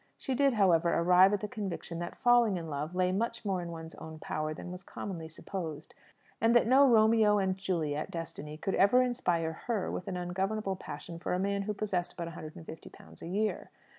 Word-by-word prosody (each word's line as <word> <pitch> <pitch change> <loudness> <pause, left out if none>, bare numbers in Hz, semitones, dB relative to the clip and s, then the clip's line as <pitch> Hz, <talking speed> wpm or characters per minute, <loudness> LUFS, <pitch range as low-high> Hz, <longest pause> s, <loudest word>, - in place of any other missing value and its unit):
She 265 - -3
did, 275 +1 +3
however, 175 -5 +4
arrive 180 +3 +5
at 205 - 0
the 210 - -3
conviction 195 -7 -5
that 175 - -5
falling 240 -5 +4
in 165 -2 -6
love 150 +5 -4
lay 180 0 +2
much 230 +4 -2
more 190 -3 0
in 170 - -6
one's 160 -1 -8
own 160 0 -9
power 155 0 -3
than 170 +3 -7
was 180 0 -7
commonly 175 -4 -6
supposed; 160 -2 -6 0.5
and 230 +1 +4
that 240 - +6
no 270 +4 +6
Romeo 220 -2 +5
and 190 -2 +1
Juliet 165 -6 -2
destiny 155 -2 -6
could 195 - -2
ever 245 +6 +5
inspire 175 -10 0
her 225 -6 -1
with 180 - -5
an 185 -2 -3
ungovernable 190 +3 -2
passion 170 -1 -8
for 180 - -1
a - - -1
man 200 +1 0
who 210 +1 -3
possessed 190 -4 -2
but 170 -1 -4
a - - -6
hundred 155 -2 -9
and 165 - -10
fifty 160 - -9
pounds - - -16
a - - -7
year. 210 +4 -1
185 Hz, 215 wpm, -31 LUFS, 165-215 Hz, 0.5 s, that